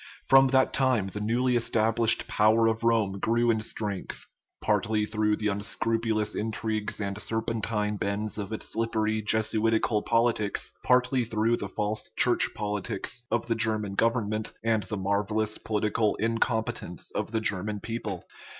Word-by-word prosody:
From 135 0 +6
that 130 0 +2
time 130 -7 +1
the 105 - -6
newly 120 +4 +1
established 115 0 +3
power 110 +2 +3
of 115 0 0
Rome 110 -4 +1
grew 120 +3 +2
in 110 -1 0
strength; 105 -3 -4 0.3
partly 105 0 +1
through 105 -1 0
the 105 -1 -1
unscrupulous 110 +2 -1
intrigues 110 -1 -2
and 100 0 -3
serpentine 110 -2 -1
bends 100 +1 -2
of 100 0 -5
its 110 - -4
slippery 110 -1 0
Jesuitical 110 0 +1
politics, 115 -3 0
partly 125 0 +3
through 115 +1 +1
the 100 - -4
false 105 +2 -2
Church 125 - +3
politics 105 +2 -3
of - - 0
the 120 - 0
German 110 -3 -1
government 110 0 0
and 115 -1 +2
the 100 +2 -5
marvellous 105 +2 -1
political 105 0 0
incompetence 115 0 -2
of - - -3
the 110 0 -1
German 105 0 -2
people. 115 +3 -5
110 Hz, 140 wpm, -27 LUFS, 105-115 Hz, 0.3 s, From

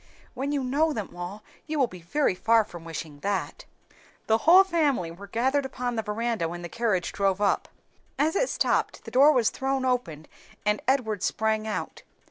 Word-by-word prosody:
"When 270 +3 -3
you 285 -2 0
know 295 +5 +1
them 210 -8 -5
all 180 +4 -7 0.2
you 310 0 -2
will 275 - +4
be 180 -7 -11
very 190 - +1
far 225 +4 +3
from 175 -5 -11
wishing 160 -3 -7
that." 200 +5 -3 0.6
The 220 0 +3
whole 370 +3 +9
family 295 - 0
were 195 +4 -11
gathered 260 +7 +1
upon 250 -2 -3
the 220 - 0
veranda 220 -4 -2
when 175 +1 -7
the 175 - -6
carriage 210 -6 0
drove 195 -1 0
up. 205 -1 +1 0.5
As 310 +4 +1
it - - +1
stopped, - - 0
the - - -8
door 280 +4 +6
was 245 -6 +2
thrown 265 0 -1
open, 170 - -1 0.4
and 210 0 +1
Edward 225 -7 +1
sprang 220 0 0
out. 215 - -4
225 Hz, 185 wpm, -26 LUFS, 190-270 Hz, 0.6 s, whole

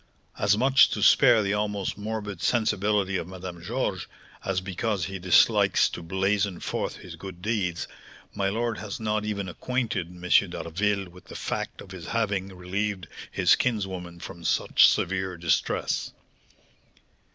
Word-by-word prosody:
As 100 0 +3
much 135 +3 +6
to - - -2
spare 120 -6 +6
the 100 0 0
almost 105 -2 -1
morbid 105 -1 -5
sensibility 105 -4 +1
of 85 - -4
Madame 90 -2 -8
Georges, 100 -1 -2 0.4
as 95 -1 0
because 95 +1 -2
he 95 +1 -5
dislikes 90 0 +4
to - - -7
blazon 95 +2 0
forth - - -3
his - - -10
good 95 -2 -10
deeds, 95 -6 -1 0.5
my 100 -1 0
lord 115 +2 -1
has 105 -2 -6
not 105 -1 -1
even 100 -2 -2
acquainted 120 -2 -2
M. 90 0 -9 0.2
d'Harville 100 +4 -1
with 90 +1 -16
the - - -11
fact - - -4
of 95 - -12
his 90 -3 -8
having 100 -4 0
relieved 95 0 -3 0.2
his - - +4
kinswoman 95 -7 -2
from 85 -1 -9
such - - +5
severe 95 0 0
distress." 85 0 0
95 Hz, 145 wpm, -26 LUFS, 90-105 Hz, 0.5 s, much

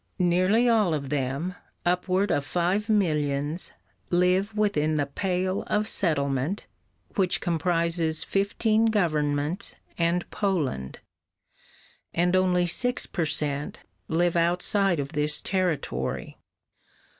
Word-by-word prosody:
Nearly 185 +6 +3
all 215 -8 +3
of 140 -2 -4
them, 140 +5 -2 0.3
upward 185 +3 +1
of 145 - +1
five 180 +8 0
millions, 150 -5 0 0.4
live 185 +4 +2
within 155 -8 +1
the 145 -2 +1
Pale 185 +5 -1
of 210 +1 0
Settlement, 145 -2 0 0.5
which 185 -3 +2
comprises 165 -1 0
fifteen 215 +3 +1
governments 155 -3 0 0.2
and 170 +1 +1
Poland, 150 - -2 1.1
and 175 +2 +2
only 180 -1 +3
six 245 +8 0
per 170 - -2
cent. 150 -1 -2 0.3
live 175 +1 +1
outside 175 +1 +2
of 140 -1 -3
this 150 -1 +2
territory. 160 - -2
175 Hz, 105 wpm, -26 LUFS, 150-195 Hz, 1.1 s, Nearly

